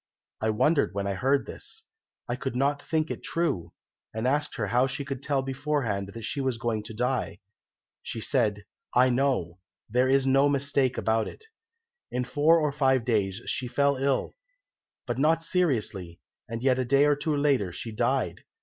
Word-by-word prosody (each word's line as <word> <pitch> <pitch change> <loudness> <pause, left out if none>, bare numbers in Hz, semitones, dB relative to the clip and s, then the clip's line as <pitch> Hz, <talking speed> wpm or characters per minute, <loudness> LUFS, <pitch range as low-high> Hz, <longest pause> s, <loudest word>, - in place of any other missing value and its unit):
I 110 - +1
wondered 140 +2 +2
when 100 0 -1
I 100 - -1
heard 135 +8 +1
this. 445 - -8 0.4
I 120 - -1
could 130 0 -4
not 140 +2 +1
think 160 0 -1
it - - -5
true, 165 - -1 0.4
and 110 +2 -2
asked 150 +3 0
her 105 - -1
how 125 +4 +3
she 140 +1 -4
could 135 -2 -5
tell 140 -2 0
beforehand 135 -7 -2
that 115 - -7
she 145 +2 -2
was 130 -3 -1
going 115 -2 -1
to 110 - -7
die. 125 +3 -1 0.6
She - - -5
said, 105 -1 0 0.3
'I 125 +1 +5
know, 120 -10 0 0.3
there 125 +4 +2
is 135 0 +3
no 135 +2 +4
mistake 140 -2 +1
about 110 0 +1
it.' 445 - -11 0.6
"In 125 - -1
four 150 +6 +4
or 150 -2 +1
five 130 -4 +2
days 100 -5 0
she 125 - -2
fell 140 +3 +2
ill, 135 0 0 0.7
but 120 0 -3
not 160 +3 +3
seriously, 110 - -1 0.3
and 115 +1 -5
yet 130 -1 +3
a - - +2
day 140 +3 +4
or 145 0 +4
two 150 +1 -1
later 140 -10 +2
she 115 +6 -6
died. 105 - 0
130 Hz, 180 wpm, -27 LUFS, 115-140 Hz, 0.7 s, I